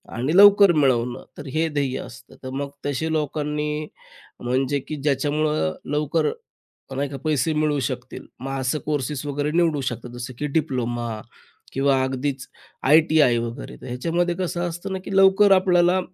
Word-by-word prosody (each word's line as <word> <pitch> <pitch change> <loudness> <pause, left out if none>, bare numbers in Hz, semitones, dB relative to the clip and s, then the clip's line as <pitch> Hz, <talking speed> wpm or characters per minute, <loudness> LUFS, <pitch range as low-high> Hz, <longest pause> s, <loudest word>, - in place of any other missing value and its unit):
आणि 135 +8 -1
लवकर 200 -1 +8
मिळवणं 125 -5 +1
तर 145 -1 -8
हे 160 +1 +1
ध्येय 140 -3 -1
असतं. 125 +1 -11
तर 130 - -5
मग 140 +1 -3 0.2
तसे 150 +3 -1
लोकांनी 150 0 -2 0.5
म्हणजे 130 +3 0
की 155 - -4
ज्याच्यामुळं 145 - 0 0.2
लवकर 150 +1 +1 0.6
पण 135 - -6
नाही 140 0 0
का 140 - -5
पैसे 155 0 +1
मिळवू 150 -1 +1
शकतील 125 -2 -7
मग 135 +1 -4
असं 130 +4 0
कोर्सेस 145 -1 -2
वगैरे 145 +1 -1
निवडू 165 -4 +2
शकतात. 120 -1 -4
जसं 125 +1 -7
की 150 - -2
डिप्लोमा 120 -7 -2 0.5
किंवा 135 -1 +2
अगदीच 130 0 -3 0.4
आय-टी-आय 155 -3 +5
वगैरे 115 0 -6
तर - - -10
ह्याच्यामध्ये 170 +8 -1
कसं 175 -1 -2
असतं 175 +3 -6
ना 190 - -2
की 195 - -3
लवकर 195 +1 +6
आपल्याला 180 -1 +4
145 Hz, 155 wpm, -23 LUFS, 130-160 Hz, 0.6 s, लवकर